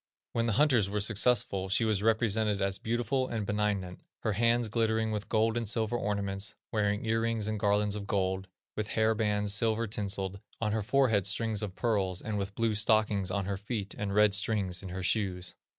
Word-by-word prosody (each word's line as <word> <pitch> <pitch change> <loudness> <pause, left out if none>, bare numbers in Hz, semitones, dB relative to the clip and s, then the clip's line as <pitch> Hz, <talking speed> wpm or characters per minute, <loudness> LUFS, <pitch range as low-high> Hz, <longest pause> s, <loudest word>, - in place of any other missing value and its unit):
When 115 0 0
the 115 - +1
hunters 125 -6 +3
were 105 +1 -1
successful 100 -2 +2
she 95 +4 +2
was 105 -3 +1
represented 110 -2 +1
as 95 0 0
beautiful 120 +3 -1
and 110 -4 -3
benignant, 100 -3 -2 0.2
her 110 - 0
hands 115 +2 +2
glittering 110 0 0
with 105 -1 -4
gold 110 0 +2
and 115 -3 -1
silver 110 +1 0
ornaments, 100 -2 -2 0.2
wearing 105 -1 0
ear 115 0 +1
rings 115 -2 -1
and 110 -1 -2
garlands 105 0 +2
of 100 -1 -6
gold, 95 -1 -1 0.3
with 105 -1 -2
hair 110 0 +4
bands 105 -2 +1
silver 110 +1 +1
tinseled, 100 -2 -2 0.2
on 105 -2 0
her 110 0 0
forehead 110 -4 +2
strings 110 +1 0
of 100 -3 -5
pearls, 100 -6 0
and 105 0 -3
with 100 0 -4
blue 115 -1 +1
stockings 105 -2 +2
on 100 0 -1
her 100 0 -2
feet, 105 0 -4
and 100 -1 -3
red 105 -1 +5
strings 100 -4 0
in 95 - -7
her 95 +1 -5
shoes. 95 -2 -1
105 Hz, 195 wpm, -30 LUFS, 100-110 Hz, 0.3 s, red